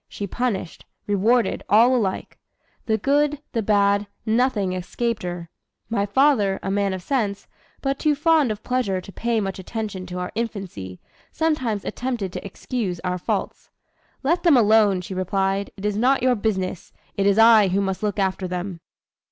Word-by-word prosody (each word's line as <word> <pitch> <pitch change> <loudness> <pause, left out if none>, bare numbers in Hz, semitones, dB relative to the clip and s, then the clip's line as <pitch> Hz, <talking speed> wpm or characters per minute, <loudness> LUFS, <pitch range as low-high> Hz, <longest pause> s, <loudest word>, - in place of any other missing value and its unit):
She 205 - -5
punished, 200 -4 -3 0.2
rewarded 220 +4 +2
all 235 +5 +6
alike; 200 -6 -2 0.5
the 220 -1 +2
good, 290 +5 +1
the 230 - -1
bad, 200 -1 +2 0.2
nothing 220 -4 +1
escaped 225 +5 -2
her. 175 -1 -5 0.4
My 205 -3 0
father, 210 -4 +3
a 195 - -2
man 200 0 +1
of 185 - -8
sense, 215 -7 -1 0.4
but 275 0 -1
too 305 -2 +2
fond 310 -2 +3
of 215 0 -6
pleasure 250 -7 0
to 190 +2 -11
pay 230 +2 -1
much 195 -2 -3
attention 200 -2 -5
to 180 0 -6
our 180 0 -4
infancy, 190 - -5 0.3
sometimes 260 -11 -1
attempted 235 -7 -3
to - - -5
excuse 200 -2 -4
our 180 0 -2
faults. - - -3 0.5
'Let 335 +6 +2
them 330 -7 +5
alone,' 210 -4 +4
she 180 - -7
replied; 195 +1 -1
'it 195 - -7
is 210 -1 0
not 255 +3 +2
your 255 -1 +4
business, 190 -5 -2 0.2
it 200 0 +1
is 200 0 +3
I 225 -2 +7
who 190 +2 +1
must 190 -2 -2
look 210 -2 -1
after 190 -1 0
them.'" 180 0 -4
205 Hz, 170 wpm, -23 LUFS, 190-240 Hz, 0.5 s, I